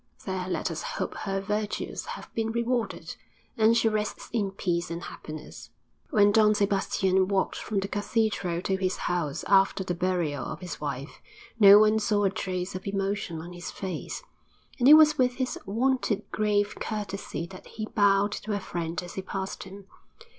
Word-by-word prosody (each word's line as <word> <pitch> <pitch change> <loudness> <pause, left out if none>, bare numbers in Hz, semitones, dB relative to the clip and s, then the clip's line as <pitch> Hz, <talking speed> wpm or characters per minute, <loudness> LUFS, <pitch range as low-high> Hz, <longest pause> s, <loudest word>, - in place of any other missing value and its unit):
There 185 -1 -3
let - - -1
us - - -4
hope - - -3
her 195 -1 -3
virtues 210 +2 -3
have - - -8
been 225 0 -1
rewarded, 235 0 -2 0.4
and 225 -1 +4
she 230 - +3
rests 215 -1 -2
in 210 -4 +1
peace 175 -3 -2
and 170 +1 -5
happiness. 155 0 -9 0.4
IV - - -24
When 205 -3 +6
Don 215 0 +5
Sebastian 195 -2 +2
walked 195 -1 0
from 210 -2 -2
the 195 - -3
cathedral 205 -4 -1
to 190 - 0
his 185 -1 -1
house 170 -5 -2
after 195 0 +4
the 180 - -2
burial 175 -6 -1
of - - -5
his 180 -4 -7
wife, 140 -1 -5 0.4
no 200 -1 +10
one 215 +1 +5
saw 205 -1 +1
a 195 - +3
trace 185 -3 -3
of 185 +2 -6
emotion 195 -4 -2
on 175 +2 -9
his 175 0 -7
face, 190 - -5 0.6
and 245 - +4
it 300 - +11
was 305 -2 +6
with 250 -1 +3
his 255 -1 -2
wonted 230 -1 +1
grave 205 -1 +1
courtesy 205 -5 -4
that 185 - -11
he 215 - -5
bowed 200 -1 +3
to 210 +1 -4
a 205 - 0
friend 170 -2 -4
as 175 - -9
he 190 - -4
passed 190 0 -5
him. 195 +1 -11
195 Hz, 180 wpm, -27 LUFS, 185-215 Hz, 0.6 s, it